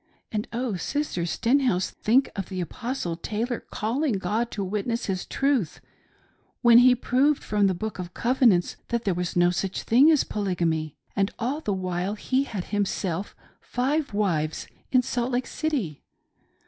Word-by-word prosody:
And, 210 -1 -2
oh. 235 -4 -2
Sister 180 - -2
Stenhouse, 235 -2 +1
think 255 +5 +2
of 195 -2 -4
the 185 -2 -4
Apostle 180 0 -3
Taylor 225 +7 -3
calling 250 +6 -1
God 215 +4 -1
to 205 - -4
witness 210 +5 -2
his 185 -2 -3
truth 270 - 0 0.8
when 235 0 +8
he 250 0 +7
proved 270 +4 +2
from 205 -1 +2
the 190 - +1
Book 215 +2 -5
Of 180 -1 -6
Covenants 240 -7 +3
that 235 -1 -1
there 195 - +1
was 175 0 -3
no 175 0 +4
such 190 +1 -2
thing 260 +7 +6
as 310 -4 +4
Poly 200 -3 -2
gamy: 160 -3 -1 0.2
and 195 0 +2
all 265 +6 -2
the 210 - -2
while 185 +1 -2
he 260 +5 0
had 205 -9 -4
himself 195 -2 -1 0.2
five 280 +4 -1
wives 170 -7 0 0.3
in 255 -1 +4
Salt 245 +1 -2
Lake 245 0 0
City 255 - -2
215 Hz, 160 wpm, -26 LUFS, 185-250 Hz, 0.8 s, when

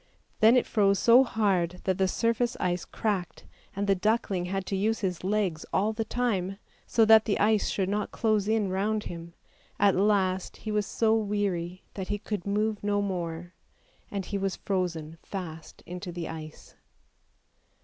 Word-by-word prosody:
Then 225 +3 +6
it 250 - +2
froze 200 -2 +3
so 240 +5 +6
hard 190 -7 0
that 190 0 0
the 190 - +3
surface 230 +4 0
ice 180 -1 -1
cracked, 200 -5 -3 0.3
and 200 +1 -1
the 200 - +4
duckling 195 -2 0
had 195 +1 -3
to 195 - -2
use 220 +4 0
his 180 -4 -2
legs 190 -5 0
all 210 +3 +1
the 225 +1 -2
time, 210 -5 -1 0.3
so 225 - +4
that 220 0 +7
the 205 - +1
ice 210 0 +3
should 190 -2 0
not 205 +1 -1
close 215 -3 +1
in 215 -2 +1
round 210 +3 0
him; 170 0 -8 0.4
at 200 -1 +4
last 190 -2 +1
he 215 - -5
was 210 -1 0
so 220 -1 +2
weary 200 -5 -1
that 190 -2 -5
he 205 - -1
could 205 -2 -5
move 210 +1 0
no 205 0 +1
more, 175 -3 -3 0.6
and 195 -2 -4
he 200 - -3
was 195 -1 -1
frozen 165 -4 -3
fast 165 -5 -8
into 180 +1 -6
the 170 -1 -5
ice. 155 -1 -9
200 Hz, 170 wpm, -28 LUFS, 180-215 Hz, 0.6 s, that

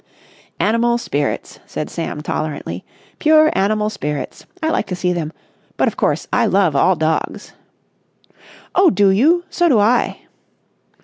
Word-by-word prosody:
"Animal 235 +2 +2
spirits!" 145 -11 -3
said - - -4
Sam 150 - -5
tolerantly. 155 -1 -4 0.4
"Pure 310 0 +4
animal 210 +2 +1
spirits. 150 -8 -5 0.2
I 315 - +2
like 215 - -1
to 180 - -3
see 180 0 0
them. 160 -3 -3 0.5
But, - - +2
of - - -1
course, - - 0
I - - +3
love 190 -6 +2
all 185 +7 +4
dogs." 160 0 -2 1.2
"Oh, 375 -1 +5
do 205 -8 +3
you? 315 - +3
So 350 -1 +2
do 255 - +4
I!" 220 +4 +2
205 Hz, 140 wpm, -18 LUFS, 160-245 Hz, 1.2 s, Oh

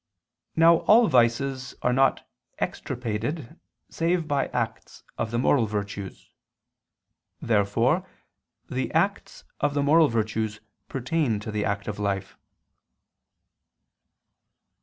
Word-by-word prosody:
Now 165 +1 +6
all 230 +3 +7
vices 130 0 +1
are 125 - +2
not 135 +1 +2 0.3
extirpated 125 +6 -4 0.3
save 165 0 -1
by 145 -2 0
acts 115 -2 -4
of 115 - -2
the 120 - -2
moral 120 -1 +3
virtues. 100 -2 -5 1.1
Therefore 115 - +1 0.6
the 130 +1 -3
acts 195 +6 -1 0.2
of 145 -1 0
the 145 - +1
moral 155 +2 +5
virtues 110 -2 -2 0.3
pertain 130 -3 -1
to 110 - -6
the 105 0 -1
active 100 +1 -3
life. 100 -1 -2
125 Hz, 100 wpm, -26 LUFS, 110-145 Hz, 1.1 s, all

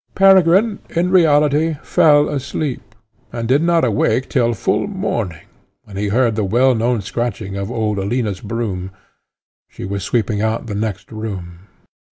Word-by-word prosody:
Peregrine, 195 +2 +4 0.2
in 175 +2 +1
reality, 155 -2 +3
fell 145 -2 +4
asleep, 135 -6 -4 0.4
and 115 -1 -4
did 135 +5 +3
not 170 -3 +2
awake 115 +2 +1
till 120 -2 +1
full - - 0
morning, 115 - -3 0.4
when 100 - -13
he 105 +1 -2
heard 115 +2 +1
the 110 - -1
well 120 +7 +3
known 115 0 0
scratching 110 -1 -4
of 100 +1 -4
old 110 -4 -1
Alina's 100 -1 -2
broom; 100 -4 -4 0.8
she - - -9
was 100 +1 -4
sweeping 110 -1 -1
out 110 +1 -1
the 110 - -5
next 100 -1 -4
room. 95 -5 -7
115 Hz, 150 wpm, -18 LUFS, 100-145 Hz, 0.8 s, Peregrine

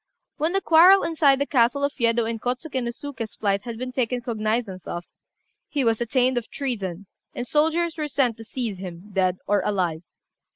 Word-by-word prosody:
When 315 +3 0
the 390 - +2
quarrel 360 +4 +7
inside 300 -4 +3
the 280 - 0
castle 260 +1 +2
of 285 0 +1
Yedo 230 -1 +2
and 225 -1 -4
Kôtsuké 255 +2 -2
no 240 - -2
Suké's 235 -3 -6
flight 200 -1 0
had 235 -2 -5
been 255 +2 -4
taken 250 -1 -1
cognizance 220 -4 -2
of, 175 0 -5 0.6
he 285 -3 0
was 230 -1 +1
attainted 245 +1 +1
of - - -25
treason, 200 - -4 0.3
and 245 - -3
soldiers 320 +4 +1
were 305 -1 -2
sent 265 -5 +1
to 225 - -9
seize 225 -4 -4
him, 185 +2 -9
dead 185 -1 +1
or 205 -1 +2
alive. 180 -6 -1
240 Hz, 190 wpm, -24 LUFS, 210-280 Hz, 0.6 s, quarrel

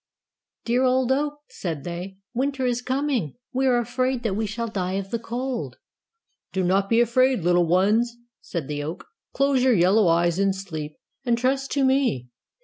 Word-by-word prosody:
"Dear 245 +2 +2
old 260 0 +2
oak," 295 +2 0
said 160 -6 -5
they, 180 +2 -6 0.2
"winter 265 +1 -1
is 245 -1 0
coming: 260 - -1 0.2
we 265 +1 +1
are 250 -2 +4
afraid 255 +1 -1
that 220 -4 0
we 220 +1 -1
shall 230 +3 -3
die 185 -4 -2
of 195 0 -3
the 235 - -1
cold." 245 +2 -4 0.8
"Do 190 - 0
not 195 +2 +2
be 230 - +4
afraid, 255 0 +3
little 175 0 +3
ones," 215 +7 +2 0.2
said 165 -6 -5
the 145 -1 -3
oak, 155 +4 -6 0.3
"close 275 -1 +2
your 255 -3 +4
yellow 190 +3 +4
eyes 170 +1 +2
in 195 -1 +3
sleep, 160 -6 -6 0.3
and 240 -2 +1
trust 270 +2 0
to 275 -2 +2
me. 260 - +1
230 Hz, 175 wpm, -24 LUFS, 180-255 Hz, 0.8 s, are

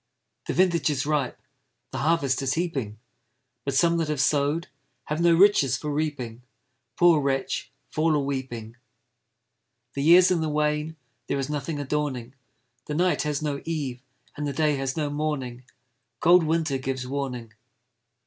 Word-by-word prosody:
The - - -2
vintage 170 -5 +3
is 140 -2 -1
ripe, 145 -4 -1 0.5
The - - -4
harvest 145 -4 +1
is 135 -1 0
heaping; 140 -11 -2 0.7
But 140 -1 -1
some 170 +3 +4
that 165 -2 0
have 150 -2 -2
sow'd 145 +4 +1 0.4
Have 150 +4 -3
no 170 -1 +5
riches 165 - +5
for 150 - -4
reaping; 140 -6 -3 0.6
Poor 170 -3 +5
wretch, 135 -1 -1 0.2
fall 155 0 +2
a - - +2
weeping! 130 -5 -4 1.2
The 140 - -3
year's 175 +5 +7
in 175 -3 +2
the 160 - -1
wane, 150 +1 0 0.3
There - - -1
is 135 +1 -2
nothing 150 +1 -3
adorning, 140 -4 -2 0.5
The 150 - -3
night 180 +3 +2
has 150 0 -2
no 145 -2 -2
eve, 140 -7 -3 0.3
And 150 0 -3
the 140 - -2
day 150 -1 +2
has 135 +1 -3
no 150 -2 -1
morning; 135 -5 -3 0.5
Cold 175 0 +5
winter 155 -3 0
gives 130 -1 -3
warning. 125 -4 -4
150 Hz, 155 wpm, -26 LUFS, 135-160 Hz, 1.2 s, year's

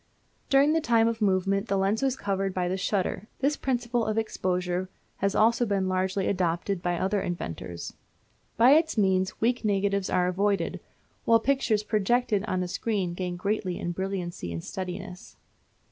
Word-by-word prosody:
During 280 +2 +5
the 325 - +2
time 230 -4 +3
of 230 -1 -2
movement 195 +1 +1
the 200 - +1
lens 195 +3 +1
was 265 -1 +1
covered 195 -1 -2
by 180 -1 0
the 180 - -1
shutter. 190 +1 -1
This 280 +3 +1
principle 245 -3 -1
of 215 0 -1
exposure 185 -4 -1 0.3
has 200 0 0
also 230 +2 +4
been 200 -4 0
largely 185 +1 0
adopted 180 0 0
by 175 -2 -1
other 195 +3 0
inventors. 85 - -5 0.6
By 240 +3 +7
its 320 -2 +4
means 190 -2 +1
weak 245 +2 +1
negatives 200 -2 +1
are 180 0 +2
avoided, 200 +2 0 0.5
while 230 0 +5
pictures 230 -4 +1
projected 215 0 +1
on 185 -3 -1
to - - -1
a - - -5
screen 190 -1 -2
gain 180 0 -3
greatly 190 -1 -1
in 175 - -3
brilliancy 180 - -4
and 85 0 -5
steadiness. 180 0 -7
195 Hz, 165 wpm, -27 LUFS, 185-225 Hz, 0.6 s, By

